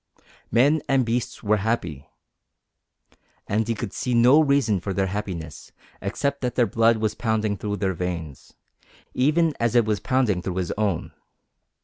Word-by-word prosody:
Men 140 +7 +3
and 135 -2 +3
beasts 120 +1 -3
were 105 0 +2
happy. 90 - -3 1.4
And 110 +2 0
he 115 - 0
could 105 -1 -5
see 125 -1 -1
no 125 +6 +6
reason 140 -9 +2
for 95 +2 -4
their 95 - +1
happiness 95 -6 -6 0.3
except 140 +8 -2
that 125 -2 -2
their 120 - +4
blood 115 +2 +3
was 110 -1 -1
pounding 110 -2 -1
through 105 +1 -4
their 95 -2 0
veins, 85 -5 -5 0.6
even 155 +4 +2
as 120 +1 0
it 120 -2 +5
was 105 -2 0
pounding 125 -8 +1
through 90 0 -4
his 90 -2 -2
own. 100 -5 -1
110 Hz, 155 wpm, -24 LUFS, 95-125 Hz, 1.4 s, no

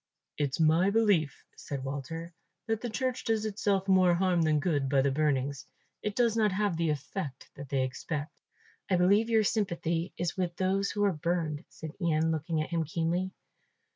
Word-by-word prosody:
"It's 145 -1 -1
my 165 +4 +4
belief," 200 - +2
said 140 -2 -6
Walter, 155 +5 -5 0.3
"that 225 -1 -1
the 240 - -3
church 255 +2 -2
does 220 -2 +1
itself 200 -2 0
more 185 -2 +5
harm 180 -1 +2
than 155 -2 +3
good 145 -4 0
by 135 -1 +3
the 140 - +2
burnings; 140 -2 0 0.3
it 210 -1 -3
does 235 -3 +2
not 215 -2 +3
have 200 -1 0
the 165 0 0
effect 145 0 -4
that 140 -1 -9
they 135 -1 +1
expect." 145 +4 -5 0.5
"I 190 - +3
believe 200 +6 +4
your 220 -1 +4
sympathy 175 -5 -1
is 175 -1 -2
with 180 -2 -2
those 195 +2 +1
who 205 - -1
are 200 -2 +3
burned," 160 -1 -2
said 160 -1 -8
Ian, 160 -1 +2
looking 160 0 -1
at 155 - -9
him 165 -1 +1
keenly. 170 +4 -1
170 Hz, 180 wpm, -30 LUFS, 150-195 Hz, 0.5 s, more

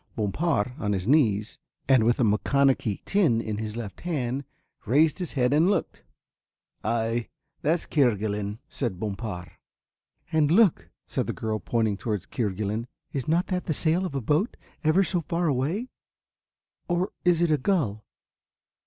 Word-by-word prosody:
Bompard, 115 - 0
on 105 -1 0
his 95 -2 -2
knees, 110 -6 +2 0.3
and 130 -4 +5
with 120 +1 +2
a - - +4
maconochie 115 +1 +2
tin 170 - +3
in 110 -2 -3
his 110 -1 -4
left 110 -4 -6
hand, 140 -5 -2 0.4
raised 150 - +3
his 180 -4 -3
head 125 -1 +2
and 160 +5 +4
looked. 205 - -1 0.8
"Ay, 115 +1 0 0.3
that's 160 +4 +1
Kerguelen," 105 -6 0
said 115 -10 -3
Bompard. 100 -5 -4 0.8
"And 155 -2 +3
look," 170 - +4 0.2
said - - -2
the - - -1
girl, 110 -1 -2
pointing 110 -4 0
towards 105 -3 -3
Kerguelen. 105 +1 -2 0.3
"Is 135 -4 -3
not 170 +4 +2
that 180 -1 -1
the 155 - +1
sail 170 +5 +2
of 180 -7 -4
a 135 - -1
boat, 150 - +1
away - - -29 0.2
ever 165 +5 +4
so 180 -2 0
far 170 0 0
or 175 - -5
is 175 -2 +4
it 170 - +2
a 150 - +3
gull? 130 - 0
125 Hz, 155 wpm, -26 LUFS, 110-160 Hz, 0.8 s, and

